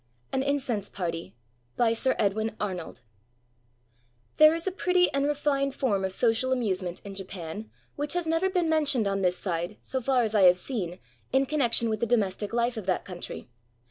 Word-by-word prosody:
AN 265 - +1
INCENSE 265 -7 -1
PARTY 170 -6 -4 0.4
BY 230 -2 +3
SIR 260 +3 +1
EDWIN 215 +1 0
ARNOLD 185 -5 -4 1.4
There 310 +1 +7
is 330 - -4
a 380 - 0
pretty 360 -1 +2
and 275 +1 +1
refined 275 -2 0
form 205 -8 0
of 190 - 0
social 230 +5 +2
amuse 215 -7 0
ment 180 -1 -5
in 200 - -7
Japan 190 +1 -7 0.3
which 290 0 0
has 350 -1 -1
never 330 +4 +1
been 360 -3 +1
mentioned 295 -7 +2
on 195 0 0
this 180 -1 +2
side, 175 +2 -3
so 260 - -4
far 255 0 +2
as 220 -1 -1
I 210 - +4
have 180 0 +7
seen, 180 -4 -3 0.3
in 265 +1 +3
connection 250 -5 +2
with 215 -1 -1
the 235 - 0
domestic 210 -3 0
Hfe 235 0 0
of 205 -4 -6
that 185 - 0
country. 180 -2 -7
230 Hz, 185 wpm, -27 LUFS, 195-275 Hz, 1.4 s, There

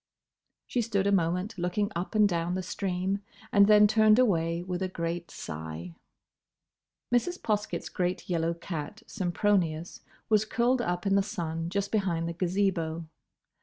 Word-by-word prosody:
She 245 - 0
stood 205 -4 0
a 200 - +3
moment 180 +3 0
looking 200 +4 0
up 175 +6 -4
and 210 -1 +6
down 175 -1 -1
the 185 - -2
stream, 190 +1 -2 0.3
and 200 -1 +6
then 210 0 +7
turned 215 +1 +5
away 170 -8 +2
with 180 0 -4
a 190 - 0
great 170 -1 -4
sigh. 80 +2 -7 1.2
Mrs. 350 +10 +1
Poskett's 210 -1 -2
great 180 -1 -2
yellow 170 -1 0
cat, 170 +4 -6
Sempronius, 175 -4 0 0.3
was 215 -1 +4
curled 240 +3 +1
up 175 -4 -2
in 195 - +2
the 200 - +5
sun 165 -5 -3
just 200 +2 -2
behind 180 -6 0
the 170 - -3
Gazebo. 175 -2 0
185 Hz, 150 wpm, -29 LUFS, 170-205 Hz, 1.2 s, then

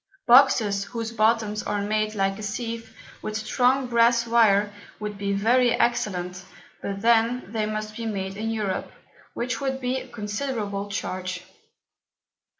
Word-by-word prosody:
Boxes 230 -6 +5
whose 230 0 -5
Bottoms 220 -2 +1
are 210 - -2
made 215 +1 0
like 195 0 0
a - - -6
Sieve 225 +1 -5 0.2
with 215 0 -3
strong 255 +4 +2
Brass 235 -1 +3
Wire, 210 -3 +4 0.3
would 210 -1 -4
be 200 0 -2
very 235 +5 +3
excellent; 185 -6 -1 0.4
but 195 +1 -5
then 235 +2 +3
they 220 -2 -1
must 215 0 -4
be 230 0 -4
made 195 -2 -3
in 220 +2 -3
Europe, 210 -4 -2 0.4
which 240 -1 -2
would 265 -1 -1
be 255 0 -1
a 260 - -10
considerable 210 -3 -3
Charge. 185 -2 -4
215 Hz, 145 wpm, -25 LUFS, 205-235 Hz, 0.4 s, Boxes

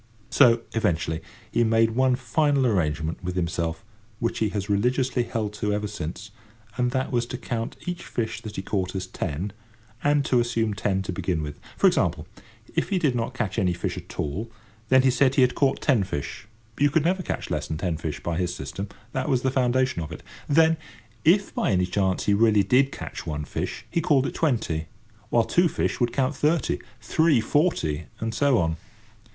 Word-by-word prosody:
So, 115 -1 +6
eventually, 85 -7 0 0.3
he - - +3
made 115 0 +3
one 130 +2 +3
final 135 +2 +1
arrangement 80 -7 0
with 90 0 -3
himself, 85 0 -2 0.3
which 115 +1 -2
he 110 - +2
has 100 -1 -3
religiously 125 +5 +1
held 110 -3 -3
to 105 - +1
ever 105 0 -1
since, 100 0 -6 0.4
and 125 -1 +1
that 130 +1 -1
was 120 -2 0
to 125 - -5
count 115 -2 -4
each 175 0 -4
fish 115 -1 -3
that 110 -2 -8
he 95 - -4
caught 95 -2 -2
as 95 -1 -2
ten, 90 +2 -4 0.5
and 145 -1 +3
to 125 - +3
assume 115 -2 0
ten 95 0 0
to 95 - -3
begin 90 -3 -1
with. 75 0 -6 0.2
For - - +2
example, - - +2 0.5
if - - 0
he 195 - +1
did 150 -8 +2
not 120 +1 -2
catch 110 -3 -1
any 90 -3 +2
fish 85 - -3
at - - -9
all, 90 +10 -2 0.4
then 130 0 +6
he 130 - +5
said 130 +1 +3
he 135 - +6
had 125 - +3
caught 140 -2 +1
ten 125 -9 +3
fish—you 110 - -3
could 155 +2 +1
never 185 +2 +2
catch - - -4
less - - -1
than 80 - -3
ten 85 0 -1
fish 80 -2 -5
by 85 -1 -1
his 90 -1 -1
system; 95 +9 -5 0.2
that 130 +4 -2
was 130 -3 +2
the 130 - +2
foundation 130 -5 +1
of 80 0 -6
it. 80 - -8 0.3
Then, 160 +2 +5 0.5
if 195 +5 +4
by - - 0
any 90 -4 +3
chance 95 0 0
he 100 - +3
really 105 -1 +4
did 135 +7 +3
catch - - -7
one 75 -1 -3
fish, - - -4
he 170 - 0
called 140 -4 +3
it - - -3
twenty, 110 - 0 0.4
while 115 0 +4
two 175 +9 +3
fish - - -1
would 120 -2 +2
count 135 +3 0
thirty, 155 +4 +1 0.2
three 145 +5 +3
forty, 110 - +1
and 115 0 -2
so 140 -1 +3
on. 80 -3 0
115 Hz, 200 wpm, -25 LUFS, 90-130 Hz, 0.5 s, So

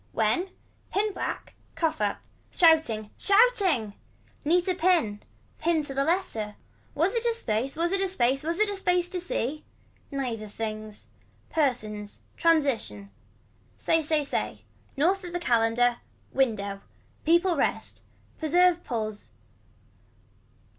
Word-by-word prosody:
When. 230 - +1 0.4
Pin 415 +1 0
black. - - -4 0.2
Cough 320 -7 -1
or - - +4
up. 205 - -3 0.3
Shouting. 310 - +3
Shouting. 395 - +3 0.5
Neater 355 +4 +2
pin. 335 - +2 0.4
Pinned 320 -2 +1
to 275 - -6
the 275 +1 +1
letter. 275 - -1 0.4
Was 335 +7 +2
it 465 -1 0
a 470 -1 +2
space 245 - -1
was 340 +2 0
it 390 0 +1
a 390 - +2
space 270 -7 +1
was 335 +2 -1
it 430 - +3
a 405 - -2
space 360 -2 +2
to 365 - -3
see. 305 -4 -3 0.5
Neither 245 -6 -3
things. 215 - -6 0.5
Persons. 215 -9 -1
Transition. 265 - +1 0.7
Say 325 0 +2
say 305 -1 +1
say. 280 - -3 0.3
North 365 +7 +2
of 350 -1 -7
the 350 - -1
calender. 235 -3 +2 0.4
Window. 200 -7 0 0.4
Peoples 340 0 +3
rest. - - -1 0.4
Preserve 350 +2 +3
pulls. 215 -4 -4
305 Hz, 125 wpm, -27 LUFS, 225-355 Hz, 0.7 s, or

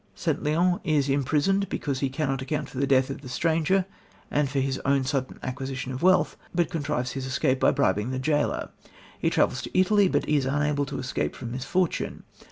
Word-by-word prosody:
St. 160 -4 -1
Leon 175 +4 +2
is 145 -3 +1
imprisoned 150 +8 +1
because 140 -3 -2
he 135 - 0
cannot 135 -1 -1
account 150 +3 -2
for 130 - -6
the 140 - +1
death 130 0 +3
of 135 - -6
the 130 - -9
stranger 165 +7 +1 0.5
and 145 -2 +1
for 140 +1 -1
his 135 0 -1
own 140 0 +2
sudden 130 -1 -2
acquisition 130 0 -4
of 130 - -5
wealth, 185 +1 +3 0.2
but 170 -2 +1
contrives 145 -5 -2
his 135 -1 -4
escape 130 0 +1
by - - +5
bribing 125 -5 +1
the 130 - -2
jailor. 145 +3 0 0.5
He - - +2
travels - - +1
to - - -1
Italy, 205 +1 +4
but 145 -5 0
is 145 -3 +2
unable 145 0 0
to 140 - -5
escape 130 - -2
from 115 - -6
misfortune. 145 +8 -1
140 Hz, 195 wpm, -26 LUFS, 130-155 Hz, 0.5 s, by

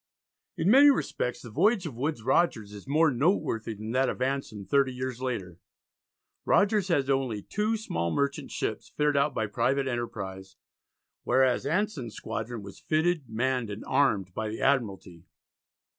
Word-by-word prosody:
In 185 - +2
many 280 +4 +8
respects 125 - -1
the 120 - -9
voyage 190 - +2
of 155 - -5
Woodes 135 -1 -2
Rogers 115 -6 +1
is 105 +4 -11
more 155 +2 +3
noteworthy 120 - 0
than 110 +2 -6
that 130 +1 +2
of - - -4
Anson 130 -6 -2
thirty 135 +5 +2
years 125 0 -5
later. 95 -9 -4 0.8
Rogers 205 -1 +3
had 145 -7 +1
only 130 -7 0
two 215 +2 -1
small 85 - -2
merchant 140 +8 -1
ships - - -4
fitted 150 -1 0
out 140 0 +2
by 110 - 0
private 135 +6 0
enterprise, 95 -6 -5 0.7
whereas 130 0 +2
Anson's 165 - -1
squadron 115 0 -5
was 100 -1 -11
fitted, 155 -3 0
manned, 125 +1 -1
and 105 +1 -6
armed, 105 -10 +1
by 110 +2 -3
the 110 - -5
Admiralty. 100 -10 0
130 Hz, 155 wpm, -28 LUFS, 110-150 Hz, 0.8 s, many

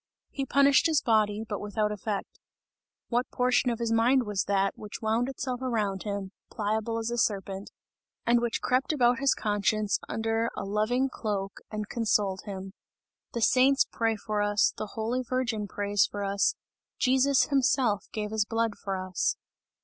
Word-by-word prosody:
He 275 -1 -3
punished 280 +3 +5
his 315 -3 +3
body, 215 -2 +2
but 205 - -4
without 210 +1 -1
effect. 210 -1 -4 0.7
What 245 +2 0
portion 250 0 +2
of 235 - -1
his 230 -1 -2
mind 245 +3 +4
was 205 -3 -1
that, 195 0 +1
which 210 -1 -8
wound 225 +3 0
itself 255 -1 -4
around 210 -7 -1
him, 200 -2 -4 0.2
pliable 220 +1 -1
as 230 +1 -2
a 240 - -1
serpent, 195 -2 -1 0.6
and 235 0 +4
which 235 -1 -2
crept 260 +4 +1
about 250 -4 +3
his 275 0 +3
conscience 210 0 0
under 225 +1 0
a - - -3
loving 215 +6 +1
cloak 205 -6 -4
and 210 -1 -4
consoled 210 -5 0
him! 195 -2 -7 0.6
The 235 - -2
saints 270 +3 +5
pray 225 -1 0
for 210 0 -2
us, 205 0 +2
the 215 - -5
holy 230 +4 -1
Virgin 245 -4 -2
prays 205 0 +1
for 205 0 -4
us, 200 +1 +1 0.4
Jesus 265 +1 +3
himself 260 -6 +2
gave 210 -1 -3
his 220 -1 +1
blood 225 -1 -1
for 195 -2 -2
us! 185 -1 -1
220 Hz, 165 wpm, -28 LUFS, 205-245 Hz, 0.7 s, punished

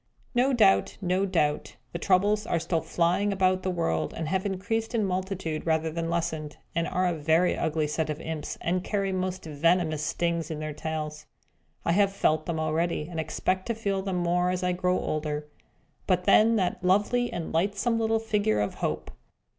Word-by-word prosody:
No 255 +2 +3
doubt 215 -6 +4
no 190 0 +1
doubt 150 -5 0 0.2
the 170 - -3
Troubles 205 +4 +2
are - - +1
still 165 0 -1
flying 180 +4 +1
about 185 -1 +2
the 185 - -2
world, 80 - -1
and 160 - -3
have 190 +2 0
increased 220 +5 -2
in 220 -3 +2
multitude, 185 -4 -2
rather 160 0 +1
than 165 +1 -3
lessened, 160 -3 -2 0.2
and 170 0 0
are 185 +1 0
a 175 - +2
very 160 +3 +2
ugly 160 -1 0
set 155 +1 -1
of 150 0 -3
imps, 160 -2 -5
and 180 +2 0
carry 195 -1 -1
most 185 -1 -2
venomous 160 +1 +1
stings 170 +1 -1
in 160 - -4
their 155 0 -4
tails. 155 0 -5 0.6
I - - +2
have 200 +2 +3
felt 155 -5 +1
them 165 -2 -1
already, 160 0 -1
and 165 - -4
expect 185 +4 -1
to 230 - -1
feel 200 -3 -1
them 190 -1 -2
more, 175 +1 +1
as 180 0 -1
I 180 - +2
grow 180 0 +1
older. 150 -1 -2 0.6
But 180 -2 +2
then 225 +4 +5
that 185 -3 0
lovely 210 +6 +2
and 165 -2 -5
lightsome 205 +7 +1
little 225 0 +2
figure 210 - +1
of 105 - -1
Hope! - - -2
180 Hz, 185 wpm, -27 LUFS, 160-195 Hz, 0.6 s, then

